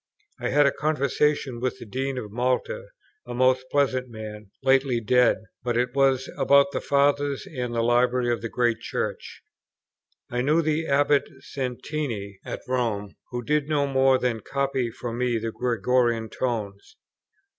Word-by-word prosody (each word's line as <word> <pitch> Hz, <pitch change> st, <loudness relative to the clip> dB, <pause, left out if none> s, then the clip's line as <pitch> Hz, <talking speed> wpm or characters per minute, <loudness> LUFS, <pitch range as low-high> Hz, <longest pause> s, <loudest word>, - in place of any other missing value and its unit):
I -, -, -2 dB
had 145 Hz, +2 st, +4 dB
a 140 Hz, -, +4 dB
conversation 145 Hz, -3 st, 0 dB
with 130 Hz, +1 st, -2 dB
the -, -, -10 dB
Dean 130 Hz, +4 st, -3 dB
of 105 Hz, -4 st, -5 dB
Malta, 130 Hz, -, -1 dB, 0.4 s
a -, -, -5 dB
most 130 Hz, +1 st, +3 dB
pleasant 130 Hz, -3 st, +1 dB
man, 105 Hz, -2 st, -8 dB
lately 135 Hz, -2 st, +3 dB
dead; 125 Hz, +2 st, +4 dB, 0.2 s
but 120 Hz, -1 st, -1 dB
it 125 Hz, 0 st, 0 dB
was 135 Hz, -1 st, +2 dB
about 140 Hz, 0 st, +5 dB
the -, -, -2 dB
Fathers, 140 Hz, 0 st, +1 dB
and 125 Hz, -5 st, -4 dB
the 115 Hz, -, +1 dB
Library 120 Hz, +1 st, +2 dB
of 115 Hz, -, -4 dB
the 115 Hz, -, -4 dB
great 120 Hz, -2 st, +1 dB
church. -, -, -4 dB, 0.8 s
I 125 Hz, 0 st, -2 dB
knew 155 Hz, +6 st, +3 dB
the 155 Hz, +1 st, 0 dB
Abbate 145 Hz, +1 st, +3 dB
Santini, 125 Hz, -6 st, -4 dB
at -, -, -6 dB
Rome, 115 Hz, -6 st, -1 dB, 0.2 s
who 120 Hz, -1 st, -4 dB
did 150 Hz, +2 st, 0 dB
no 145 Hz, -2 st, +2 dB
more 135 Hz, -1 st, +4 dB
than 125 Hz, -3 st, -1 dB
copy 135 Hz, 0 st, -1 dB
for 115 Hz, 0 st, -6 dB
me 120 Hz, 0 st, 0 dB
the 115 Hz, 0 st, -3 dB
Gregorian 120 Hz, -1 st, +1 dB
tones. 105 Hz, -6 st, -4 dB
125 Hz, 155 wpm, -25 LUFS, 120-140 Hz, 0.8 s, about